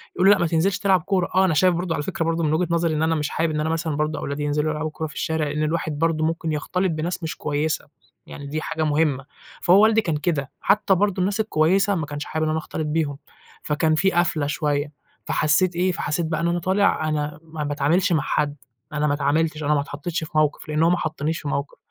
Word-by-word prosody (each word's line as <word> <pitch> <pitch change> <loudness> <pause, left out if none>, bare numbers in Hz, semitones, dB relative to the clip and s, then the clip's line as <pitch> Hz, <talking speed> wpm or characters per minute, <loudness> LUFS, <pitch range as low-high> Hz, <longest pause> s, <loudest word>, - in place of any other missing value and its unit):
يقول 180 +2 +3
له - - +9
لأ، - - 0
ما 175 - +2
تنزِلش 170 +4 +1
تلعب 190 -4 +3
كورة. 185 0 0
آه، 190 0 +5
أنا 175 - +2
شايف 180 +4 +4
برضو 175 -1 -2
على 150 - -2
فكرة 170 -1 -2
برضو 165 0 0
من 155 -1 +1
وجهة 170 +3 +1
نظري 170 -1 +1
إن 155 - 0
أنا 160 0 +2
مش 150 -2 -1
حابب 165 +1 0
إن 150 - -1
أنا 155 +1 0
مثلًا 160 -1 -1
برضو 155 +1 -1
أولادي 140 +1 -3
ينزلوا 150 +1 0
يلعبوا 155 0 -3
كورة 160 +1 -4
في - - -12
الشارع، 160 -1 -1
لإن 150 +1 -2
الواحد 155 -1 -2
برضو 165 -1 +1
ممكن 165 0 -1
يختلط 180 +5 -1
بناس 165 +2 -3
مش 160 - -3
كويسة. 150 +1 -1 0.4
يعني 145 - -8
دي 155 +2 -3
حاجة 160 0 -2
مهمة. 145 -3 +1 0.4
فهو 190 +4 +6
والدي 220 0 +5
كان 165 -7 -1
كده. 150 -4 -2
حتى 200 -1 +3
برضو 195 0 +1
الناس 200 +3 0
الكويسة 195 0 +2
ما 160 -4 -2
كانش 145 0 -5
حابب 155 - -2
إن 155 - 0
أنا 155 - 0
أختلط 155 0 -4
بيهم، 150 -2 -1 0.5
فكان 155 +1 +1
في 190 +4 +2
قفلة 165 -4 +1
شوية. 145 0 -1 0.3
فحسيت 170 +4 +2
إيه، 180 +2 +2
فحسيت 165 0 -2
بقى 160 -1 -2
إن 170 - +1
أنا 175 0 0
طالع 185 -3 +1
أنا 150 0 -2
ما 160 -1 -6
باتعاملش 150 +7 +1
مع 155 - +2
حد. 145 -1 0 0.4
أنا 150 0 +1
ما 145 - +2
اتعاملتش، 155 +2 0
أنا 150 +1 +2
ما 145 - +2
اتحطتش 150 +4 -4
في 155 - -8
مَوقِف، 155 0 +1
لإن 150 +1 +1
هو 165 - +5
ما 175 - +3
حطنيش 155 0 -2
في 150 - -6
مَوقِف. 140 0 -3
160 Hz, 240 wpm, -23 LUFS, 150-175 Hz, 0.5 s, له